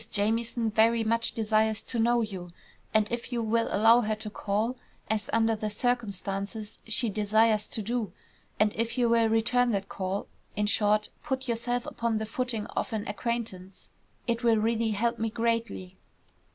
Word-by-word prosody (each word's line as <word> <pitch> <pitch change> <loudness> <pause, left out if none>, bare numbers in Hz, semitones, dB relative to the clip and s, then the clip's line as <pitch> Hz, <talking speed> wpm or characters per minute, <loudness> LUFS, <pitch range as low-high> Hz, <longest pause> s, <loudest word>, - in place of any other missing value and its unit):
Jamieson 225 +2 +1
very 225 +1 +4
much 230 +1 +1
desires 220 0 +1
to 240 - -2
know 235 +1 +3
you, 190 -5 -5 0.4
and 215 -1 +3
if 240 +1 -4
you 235 -2 -1
will 225 +1 +1
allow 225 +4 +5
her 215 -1 0
to 215 0 -7
call, 215 +5 -1 0.4
as 215 -2 -1
under 225 0 +3
the 215 0 -3
circumstances 210 -2 -2
she 230 +2 +3
desires 215 +1 +2
to 220 - -3
do, 230 -3 -2 0.5
and 215 0 +3
if 230 +2 -1
you 245 -1 +3
will 230 -1 +4
return 240 +2 +2
that 195 -1 -2
call 190 +1 -3 0.3
in 210 - +1
short, 210 0 +2
put 265 -2 -3
yourself 240 +1 -1
upon 230 -1 -1
the 220 - -2
footing 230 -2 -2
of - - -1
an 215 -2 -2
acquaintance 205 -3 -4 0.4
it 235 0 -1
will 230 -2 +4
really 225 +1 +1
help 230 +3 0
me 225 0 0
greatly." 230 -5 -2
225 Hz, 165 wpm, -28 LUFS, 210-235 Hz, 0.5 s, allow